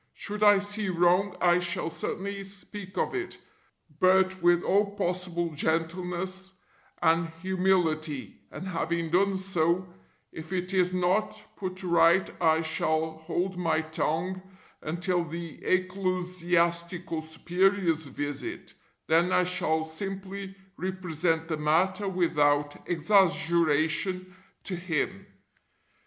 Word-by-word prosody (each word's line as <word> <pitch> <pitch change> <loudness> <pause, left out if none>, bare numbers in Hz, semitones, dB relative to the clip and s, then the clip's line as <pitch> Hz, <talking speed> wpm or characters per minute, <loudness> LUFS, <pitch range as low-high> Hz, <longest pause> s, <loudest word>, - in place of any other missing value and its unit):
Should 210 0 -5
I 205 -1 +7
see 205 +1 -1
wrong 180 +2 +2
I 175 0 +5
shall 175 -1 -2
certainly 200 +3 -4
speak 195 -1 -9
of - - 0
it, 360 -3 -4 0.6
but 185 0 +4
with 175 0 +4
all 200 0 +2
possible 180 -3 -1
gentleness 180 +4 -2 0.5
and 165 0 +3
humility, 175 -6 0 0.2
and 190 - -7
having 170 -2 -2
done 195 +2 +3
so, 185 -1 +1 0.4
if 160 +2 -9
it 180 +1 -2
is 180 -1 +3
not 185 +4 0 0.2
put 185 -1 -4
right 170 +1 +4
I 160 -1 +4
shall 160 0 0
hold 180 +3 -2
my 165 -2 +1
tongue 160 +4 -2 0.4
until 175 +3 -1
the 170 0 -7
[Ecclesiastical] 180 -2 0
Superior's 170 +1 +1
visit, 145 +1 -5 0.3
then 170 +3 +3
I 180 - +4
shall 160 -3 0
simply 195 +3 -6 0.2
represent 165 -3 -1
the 160 -2 -2
matter 185 +6 +1
without 145 -5 +1
exaggeration 170 0 +2 0.3
to 185 - -3
him. 165 - -2
180 Hz, 110 wpm, -28 LUFS, 165-190 Hz, 0.6 s, I